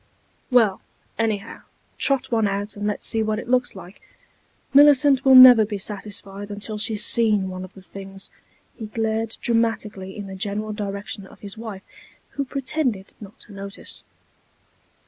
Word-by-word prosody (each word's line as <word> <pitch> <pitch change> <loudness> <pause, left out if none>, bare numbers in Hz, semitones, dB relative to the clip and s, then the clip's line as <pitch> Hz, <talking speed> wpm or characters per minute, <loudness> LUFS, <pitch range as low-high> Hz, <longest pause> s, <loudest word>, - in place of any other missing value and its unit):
"Well, 225 -7 +3 0.4
anyhow, 220 -1 -2 0.4
trot 275 -3 0
one 225 -3 +2
out, 200 +1 -3
and 205 0 -3
let's 210 - -3
see 225 - 0
what 215 0 -1
it 225 - -7
looks 250 -2 +1
like. 190 0 -12 0.7
Millicent 280 -1 +6
will 265 -1 +6
never 255 -3 +10
be 205 -1 -4
satisfied 200 0 -6
until 210 +1 -3
she's 215 -1 0
seen 210 -5 +3
one 185 0 -6
of 185 - -12
the 190 - -14
things." 195 0 -11 0.4
He 220 - -7
glared 220 +1 -2
dramatically 220 -4 -1
in 205 - -6
the 195 - -8
general 205 +3 -3
direction 200 -1 -6
of - - -18
his 200 -1 -6
wife, 220 -4 -8 0.5
who 280 - -4
pretended 260 -7 -3
not 205 -1 -12
to 210 - -12
notice. 200 0 -8
210 Hz, 155 wpm, -22 LUFS, 200-230 Hz, 0.7 s, never